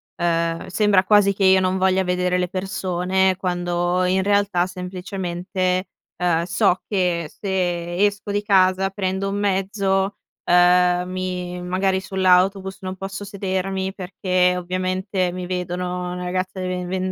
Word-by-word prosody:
ehm, 165 -1 0
sembra 200 0 +3
quasi 200 0 +4
che 195 - -1
io 190 0 +6
non 185 0 0
voglia 190 0 +2
vedere 180 0 0
le 180 - 0
persone, 185 0 0
quando 175 0 0
in 190 +1 +1
realtà 200 -3 +2
semplicemente, 185 0 -3 0.3
ehm, 170 -2 +1
so 185 0 +2
che 180 -5 0
se 175 -3 -2
esco 205 0 -2
di 205 0 0
casa, 190 -2 +3
prendo 190 0 -2
un 200 - -2
mezzo, 195 0 0 0.3
ehm, 180 0 +4
mi 180 -1 -4
magari 190 +1 0
sull'autobus 190 0 +2
non 185 0 -5
posso 195 +1 -6
sedermi, 190 -1 -3
perché 180 -1 0
ovviamente, 185 +1 -1
mi 180 0 -5
vedono 180 0 -3
una 180 0 -5
ragazza 185 +1 -3
di 185 - -2
ven 180 -1 -3
ven 185 +1 -2
185 Hz, 140 wpm, -22 LUFS, 180-190 Hz, 0.3 s, io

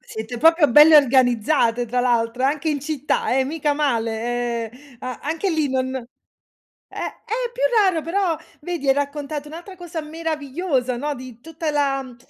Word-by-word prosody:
Siete 220 +2 -7
proprio 325 0 +5
belle 300 +3 +8
organizzate, 245 -2 +3
tra 245 +2 0
l'altro 240 0 0
anche 295 +3 0
in 290 -2 -1
città, 290 -3 -1
eh, 265 - +2
mica 295 +1 -1
male, 235 -3 -1
ehm, 260 0 -18
a 255 -1 -6
anche 325 +6 -1
lì 310 -4 0
non 260 0 -1
eh, 250 -2 -10 0.7
è 480 +2 -4
più - - -4 0.2
raro 365 -4 +2
però 345 -1 0 0.2
vedi 330 -4 -4
hai 270 - +6
raccontato 285 +1 -3
un'altra 345 +5 -10
cosa 345 -2 -6
meravigliosa, 300 -4 -2
no, 295 +3 -2
di 250 -2 -10
tutta 320 0 -4
la 280 -2 +1
uhm, 255 -2 -11
285 Hz, 160 wpm, -22 LUFS, 250-320 Hz, 0.7 s, belle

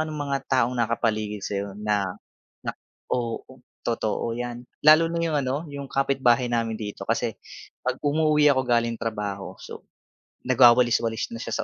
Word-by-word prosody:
ka - - +3
ng 155 - -5
mga 140 -2 -1
taong 125 -2 +2
nakapaligid 110 -3 -1
sa - - -4
iyo 100 - -4
na 105 -2 0 0.6
na - - -2 0.4
oo, 120 -2 -1 0.4
totoo 115 0 -1
yan. 120 0 -5 0.2
Lalo 155 +2 +7
na 170 +1 -2
yung 165 -2 0
ano, 135 +2 -1
yung 140 -1 -6
kapitbahay 135 -3 +2
namin 115 -1 0
dito 105 -1 -6
kasi - - -1 0.5
kapag - - -1
umuuwi 150 0 +3
ako 130 -2 +2
galing 115 -1 +1
trabaho, 105 -3 -4
so, - - -10 0.6
nagwawalis-walis 120 -2 +4
na 115 - -5
siya 115 - -5
120 Hz, 155 wpm, -25 LUFS, 115-140 Hz, 0.6 s, Lalo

